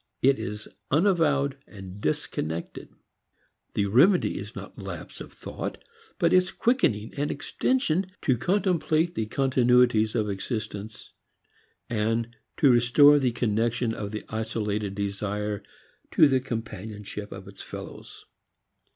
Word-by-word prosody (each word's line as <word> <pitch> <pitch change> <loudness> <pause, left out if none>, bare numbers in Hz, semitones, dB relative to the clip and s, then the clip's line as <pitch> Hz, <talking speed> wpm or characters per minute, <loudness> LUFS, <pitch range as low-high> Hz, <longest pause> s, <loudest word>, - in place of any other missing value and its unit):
It 135 -1 +4
is 105 -1 -5 0.2
unavowed 150 -5 +2
and 95 -1 -10
disconnected. 80 0 -3 0.9
The 100 - +2
remedy 145 - +4
is - - -8
not - - -9
lapse - - -8
of - - -9
thought, - - -6 0.4
but 170 -3 +2
its 185 0 +4
quickening 190 - +1
and 145 +1 0
extension 190 - 0 0.2
to 130 - +3
contemplate 175 - +1
the 110 -1 -2
continuities 125 -3 +3
of 110 -3 +1
existence, 105 +1 -5 0.7
and 115 +1 -1 0.3
restore 135 +3 +6
the 130 -3 +1
connection 115 0 0
of 105 -2 -4
the 110 +1 -5
isolated 105 -2 -2
desire 105 +1 -2 0.5
to 155 - +7
the 135 -2 +3
companionship 105 -4 -6
of - - -9
its - - -11
fellows. - - -9
115 Hz, 115 wpm, -26 LUFS, 105-145 Hz, 0.9 s, to